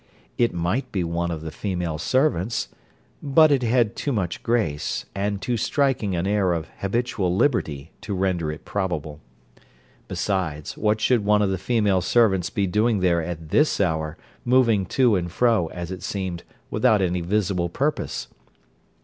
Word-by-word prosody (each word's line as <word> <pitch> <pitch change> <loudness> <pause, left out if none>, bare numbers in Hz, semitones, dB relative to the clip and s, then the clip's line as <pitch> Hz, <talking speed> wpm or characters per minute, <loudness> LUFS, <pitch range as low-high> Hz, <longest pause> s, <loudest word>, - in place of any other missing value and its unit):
It 120 -1 +2
might 90 +10 -2
be 95 -4 -1
one 85 +1 -2
of 80 -2 -4
the 80 0 -6
female 90 -3 -3
servants; 115 - 0 0.5
but 155 +2 +5
it 140 -2 +3
had 120 -2 +2
too 145 - -2
much 95 -8 -2
grace, 105 -12 -1
and 100 0 -2
too 120 +2 -1
striking 125 -5 0
an 85 +1 -1
air 100 -3 +2
of 80 -1 -4
habitual 100 -3 -1
liberty, 80 - 0
to 105 - -4
render 90 -4 0
it 75 - -9
probable. 80 -7 -3 0.9
Besides, 85 -7 -2
what 105 0 +1
should 120 -1 +2
one 105 0 +3
of 100 - +1
the 95 - -2
female 105 -4 +2
servants 95 -3 +2
be 100 -4 0
doing 105 +2 +1
there 85 -2 +3
at 80 -1 -6
this 150 - +2
hour, 80 -5 0 0.3
moving 115 -6 +3
to 125 -2 +3
and 85 -2 -2
fro, 115 -4 +2
as 85 +1 -6
it 95 - -6
seemed, 95 -4 -4 0.3
without 110 -3 +3
any 90 -1 0
visible 90 -1 0
purpose? 145 - -2
95 Hz, 160 wpm, -24 LUFS, 85-115 Hz, 0.9 s, but